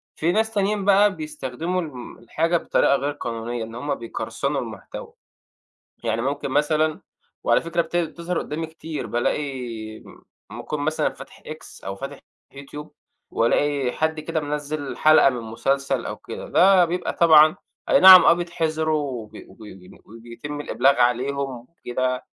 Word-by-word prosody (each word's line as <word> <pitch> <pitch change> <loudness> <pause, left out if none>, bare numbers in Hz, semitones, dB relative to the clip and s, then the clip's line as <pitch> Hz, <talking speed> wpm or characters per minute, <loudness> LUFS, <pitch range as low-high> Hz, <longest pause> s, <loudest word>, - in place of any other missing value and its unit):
في 165 +3 0
ناس 220 +3 +1
تانيين 200 -1 0
بقى 200 0 +4
بيستخدموا 185 - -4
الم 130 -7 -9
الحاجة 165 +8 0
بطريقة 140 - +2
غير 140 +1 -1
قانونية، 120 -3 -5
إن 115 +1 -9
هُم 140 +4 -3
بيقرصنوا 115 -1 -3
المحتوى - - -9 0.9
يعني 115 0 -1
ممكن 140 +1 -3
مثلًا 155 +2 +1 0.4
وعلى - - +3
فكرة 170 +1 -1
بت 165 +1 -8
بتظهر 170 +1 -2
قدامي 160 +2 -4
كتير 160 -1 -7
بالاقي 120 -4 -3
م - - -16 0.3
ممكن 150 - -6
مثلًا 155 +2 0
ابقي - - -5
فاتح - - -12
X - - -11
أو 95 0 -4
فاتح 135 +6 -8 0.4
YouTube 150 +2 -9 0.4
وألاقي 135 +3 +1
حد 160 +2 -1
كده 160 +1 -3
منزّل 145 -1 -4
حلقة 155 -2 +6
من 125 -2 -5
مسلسل 135 +3 -1
أو - - -5
كده، - - -8
ده 185 -1 +5
بيبقى 175 +2 -3
طبعًا 155 -2 +6 0.3
أينعم 185 -1 +9
آه - - +7
بيتحظرو 160 -3 -1
وبي 125 -7 -6 0.3
بي 90 -1 -16
وبيتم 115 +6 -9
الإبلاغ 135 0 +2
عليهم 130 +1 0
وكده، 130 -5 -3
145 Hz, 145 wpm, -23 LUFS, 125-165 Hz, 0.9 s, أينعم